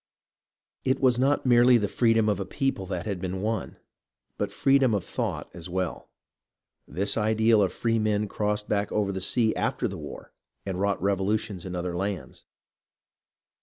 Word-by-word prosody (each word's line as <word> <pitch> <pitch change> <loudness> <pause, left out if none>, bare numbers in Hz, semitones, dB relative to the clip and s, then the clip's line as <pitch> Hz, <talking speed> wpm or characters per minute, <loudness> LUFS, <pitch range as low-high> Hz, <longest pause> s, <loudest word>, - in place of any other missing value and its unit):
It 130 - +1
was 125 -2 +3
not 140 +2 +2
merely 120 0 +6
the 105 -3 0
freedom 115 0 +2
of 105 -2 +1
a - - -1
people 135 -9 -2
that 90 -1 -4
had 100 -4 -3
been 95 +1 -3
won, 110 -2 -2 0.6
but - - -2
freedom 135 -4 +3
of 100 - -1
thought - - -3
as 85 0 -8
well. 90 -1 -3 0.8
This 100 +7 0
ideal 110 0 +3
of 95 - +2
free 115 -1 0
men 105 -1 +1
crossed 105 +1 -1
back 100 0 0
over 105 -2 0
the 95 -1 -4
sea 110 +3 +2
after - - -1
the - - -6
war - - -9 0.3
and 95 -2 -3
wrought 100 0 +1
revolutions 100 -1 -1
in 90 - -5
other 90 0 -3
lands. 95 0 -4
105 Hz, 165 wpm, -26 LUFS, 95-115 Hz, 0.8 s, merely